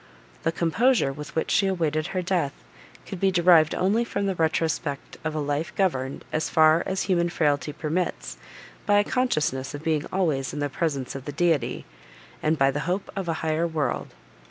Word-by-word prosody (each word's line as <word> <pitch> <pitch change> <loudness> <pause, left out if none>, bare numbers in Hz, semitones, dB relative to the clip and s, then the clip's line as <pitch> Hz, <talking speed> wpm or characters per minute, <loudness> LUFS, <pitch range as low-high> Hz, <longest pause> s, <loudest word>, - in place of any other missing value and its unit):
The 165 - +1
composure, 170 - +2
with 150 +1 -9
which 160 - -1
she 195 - +3
awaited 160 -4 0
her 185 -1 -2
death, 170 -6 0 0.5
could 195 - -7
be 195 - +3
derived 175 -3 +5
only 205 +6 +2
from 200 -3 -2
the 195 - 0
retrospect 160 -3 -1
of 155 -1 -2
a - - -1
life 145 +2 -2
governed, 135 -9 -1
as 155 - 0
far 160 0 +5
as 190 0 -1
human 175 -3 +1
frailty 150 -3 0
permits, 155 - -3 0.5
by 205 - +5
a 205 - +5
consciousness 150 - -1
of 145 - -8
being 155 -2 0
always 155 -9 0
in 150 - -4
the 145 0 -1
presence 140 -3 -2
of 135 -1 -7
the 145 - -4
Deity, 165 0 0 0.6
and 155 +1 +1
by 135 -1 +4
the 145 - -3
hope 190 +2 -2
of 195 -3 -3
a 165 - +1
higher 160 +2 +1
world. 160 -3 -2
160 Hz, 185 wpm, -25 LUFS, 145-185 Hz, 0.6 s, derived